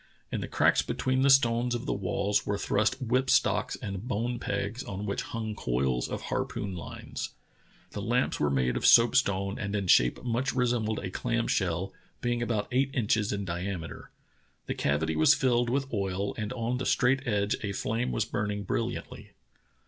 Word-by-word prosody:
In - - -2
the - - -4
cracks - - +3
between 130 0 -1
the 140 - +4
stones 120 -2 +4
of 120 - -4
the - - 0
walls 100 +2 0
were 100 - -1
thrust 110 +6 +1
whip 130 +1 0
stocks - - +2
and 100 -3 -5
bone 120 +1 -1
pegs 100 +4 -3
on 100 -2 -5
which 100 - -2
hung 110 -1 -4
coils 60 -2 0
of - - -5
harpoon 95 -3 -3
lines. 85 - -7 0.6
The - - -5
lamps - - 0
were 75 - +2
made 65 -3 +1
of - - -2
soapstone 100 -5 +4
and 100 0 -3
in 100 -2 -1
shape 60 -8 +4
much 125 +2 -1
resembled 120 -4 +1
a 95 - -4
clam 115 +4 -1
shell, 95 +1 -1 0.3
being 120 -1 -1
about 115 -3 -1
eight 130 +2 +2
inches 110 -3 +1
in 100 -1 -2
diameter. 90 -1 -5 0.6
The - - -2
cavity 80 +3 0
was 80 0 +6
filled 120 -2 +2
with 135 +1 -1
oil 100 -1 -1
and 105 -1 -4
on 120 +1 -2
the 130 - -2
straight 135 +1 +2
edge 105 -2 +1
a 105 - -2
flame 115 +5 -1
was 110 - 0
burning 105 -1 -2
brill - - -1
iantly. - - -8
105 Hz, 180 wpm, -29 LUFS, 95-120 Hz, 0.6 s, was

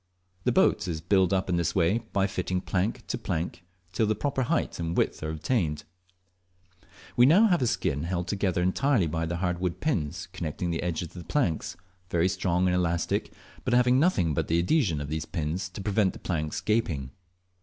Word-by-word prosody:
The - - +3
boat - - +3
is 80 -3 -2
built 95 +2 +2
up 95 -1 +1
in 90 -2 +1
this 85 - 0
way 95 +5 +3
by 100 -1 +2
fitting 90 -1 -2
plank 95 +3 -2
to - - -3
plank 85 +2 -3 0.3
till 110 +4 +1
the 110 - +1
proper 135 +4 -1
height 120 - -1
and 85 0 -2
width - - +1
are 80 - -3
obtained. 80 - -1 1.3
We 120 +1 +6
have 200 +8 +6
now - - +6
a 130 -7 0
skin 70 -9 0
held 90 0 -2
together 95 -4 0
entirely 115 +3 +2
by 80 +1 -2
the 85 - -2
hardwood 90 0 -1
pins 90 - -2
connecting 85 +1 -3
the 80 - -2
edges 85 -1 -2
of - - -23
the 90 - -8
planks, 85 - -1 0.3
very 85 +2 +2
strong 90 -1 0
and 90 - +2
elastic, 85 -2 0 0.3
but 120 - +1
having 125 +1 +4
nothing 135 - +2
but - - -1
the 80 - +2
adhesion 90 - +2
of 70 - -5
these 80 +1 -3
pins 85 +3 -3
to 95 - -8
prevent 100 -1 +1
the - - -9
planks 75 -3 -2
gaping. 85 - 0
90 Hz, 195 wpm, -27 LUFS, 85-105 Hz, 1.3 s, We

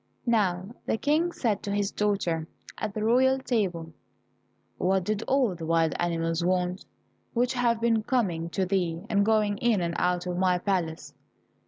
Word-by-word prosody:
Now 200 -3 +1
the - - +1
King 310 +7 +1
said 220 -10 -1
to 200 - -4
his 205 0 0
daughter, 180 -6 -1 0.3
at 215 -2 -4
the 215 - -2
royal 260 +4 +4
table, 185 -11 -2 0.9
"What 190 0 +2
did 210 +2 -1
all 260 -7 +2
the 165 -2 -7
wild 165 -1 +2
animals 165 -1 0
want, 180 +1 0 0.5
which 245 +2 +2
have 240 -2 +1
been 230 -1 +2
coming 185 -9 -1
to 185 +4 -1
thee, 180 -3 -1
and 200 -1 +3
going 210 -1 +2
in 235 -4 +2
and 170 -1 -1
out 180 0 +1
of 180 -1 -3
my 180 -1 +3
palace?" 175 -4 -2
195 Hz, 165 wpm, -27 LUFS, 175-225 Hz, 0.9 s, royal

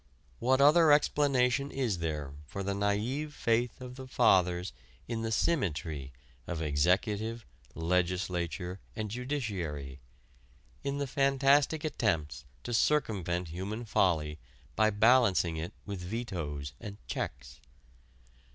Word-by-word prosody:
What 130 +3 +3
other 155 +2 +7
explanation 140 -2 +3
is 120 -11 -1
there 75 -4 -3
for 100 +6 -5
the 100 +1 -1
naïve 110 +9 -1
faith 115 -1 0
of 125 0 -8
the 130 -1 -8
Fathers 90 -5 +3 0.3
in 115 -1 -3
the 115 0 -2
"symmetry" 80 - -1 0.4
of 85 - -3
executive, 100 +9 0 0.3
legislature, 90 +1 -1 0.2
and 105 -2 -4
judiciary; 95 - -4 0.8
in 140 0 -2
the 140 - -1
fantastic 140 +3 +3
attempts 80 - -1 0.2
to 120 - -4
circumvent 95 - +1
human 100 +8 -5
folly 80 -7 +1 0.4
by 110 +1 +4
balancing 105 -6 +4
it 80 +2 -4
with 100 -3 -5
vetoes 85 - -4
and 100 -1 -8
checks? 65 -1 -5
100 Hz, 115 wpm, -31 LUFS, 85-125 Hz, 0.8 s, other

